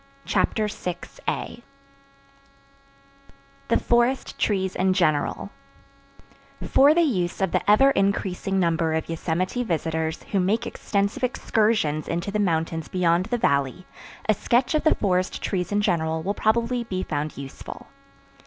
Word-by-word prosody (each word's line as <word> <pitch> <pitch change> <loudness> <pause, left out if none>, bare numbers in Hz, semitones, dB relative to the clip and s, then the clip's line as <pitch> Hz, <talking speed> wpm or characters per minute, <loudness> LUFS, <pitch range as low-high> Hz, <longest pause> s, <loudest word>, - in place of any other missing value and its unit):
Chapter 215 -1 +1
6 180 -3 -6
The 240 - -3 2.2
Forest 240 +2 +1
Trees 190 -3 0
in 190 0 +2
General 155 -6 0 1.2
For 285 +3 +5
the 345 - +4
use 185 - -1
of 190 -2 0
the - - +1
ever 270 +7 +6
increasing 195 -3 0
number 165 -2 +1
of 160 - -2
Yosemite 175 +8 -2
visitors 160 -4 -2
who 200 - +2
make 210 +6 +1
extensive 200 +6 -2
excursions 210 - +1
into 170 +4 -2
the 210 - -1
mountains 165 -4 0
beyond 180 0 +1
the 245 - -1
Valley, 140 - 0 0.4
a 215 - +5
sketch 245 +7 +1
of 310 - +1
the 315 - +5
forest 185 -2 0
trees 180 -1 -2
in 205 0 +2
general 160 -4 0
will 200 +3 -1
probably 235 +3 +1
be 185 -5 -3
found 150 +1 -3
useful. 135 -1 -9
190 Hz, 135 wpm, -24 LUFS, 165-220 Hz, 2.2 s, ever